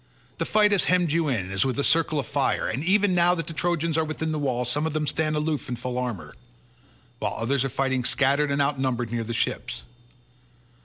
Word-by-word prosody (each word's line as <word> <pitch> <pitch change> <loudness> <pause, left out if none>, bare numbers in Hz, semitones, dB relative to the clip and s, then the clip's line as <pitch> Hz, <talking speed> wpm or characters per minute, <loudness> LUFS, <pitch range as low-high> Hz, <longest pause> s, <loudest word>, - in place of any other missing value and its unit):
The - - 0
fight 210 -1 +3
has 200 - +2
hemmed 180 -3 +2
you 165 0 +1
in 100 -9 -1
as 95 - +1
with 130 -3 -1
a 140 - +1
circle 160 0 +3
of 140 - -1
fire, - - 0
and 130 +6 -3
even 195 +2 +3
now 175 0 +4
that 165 -3 -3
the 165 - -6
Trojans 165 -1 0
are - - +2
within 155 0 -3
the 155 - -2
wall 125 -3 -1
some 150 +6 0
of 160 - -4
them 155 -1 -1
stand 155 +1 0
aloof 150 -2 -2
in 125 - -2
full 125 +1 -4
armour, 100 -12 -4 0.9
while 105 -1 -2
others 125 +4 0
are 135 - -1
fighting 130 0 0
scattered 140 +3 +2
and 140 0 +2
outnumbered 130 -4 -1
near 120 -1 -1
the 115 +1 -4
ships. - - -2
145 Hz, 220 wpm, -25 LUFS, 125-160 Hz, 0.9 s, now